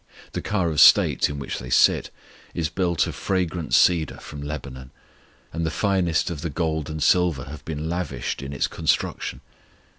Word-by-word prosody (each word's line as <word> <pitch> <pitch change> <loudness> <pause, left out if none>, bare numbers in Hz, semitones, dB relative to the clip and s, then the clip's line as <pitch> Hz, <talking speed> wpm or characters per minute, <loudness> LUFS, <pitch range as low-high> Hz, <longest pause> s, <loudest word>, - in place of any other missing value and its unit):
The - - -4
car 95 -5 0
of 75 - -1
state - - +6
in 75 - -5
which 70 - -5
they 60 - -8
sit - - +4 0.5
is 80 -2 -1
built 85 -1 0
of - - -5
fragrant 90 -3 -1
cedar 85 -5 +3
from 75 -1 -9
Lebanon, 70 -3 -7 0.6
and 85 +1 -2
the 80 - 0
finest 90 -1 0
of 75 -4 -5
the 85 - -3
gold 80 -1 -2
and 80 -1 -3
silver 90 -7 +3
have 70 +3 -10
been 80 0 -4
lavished 80 -9 -3
in 70 0 -6
its 70 - 0
construction. - - -1
80 Hz, 175 wpm, -24 LUFS, 70-85 Hz, 0.6 s, state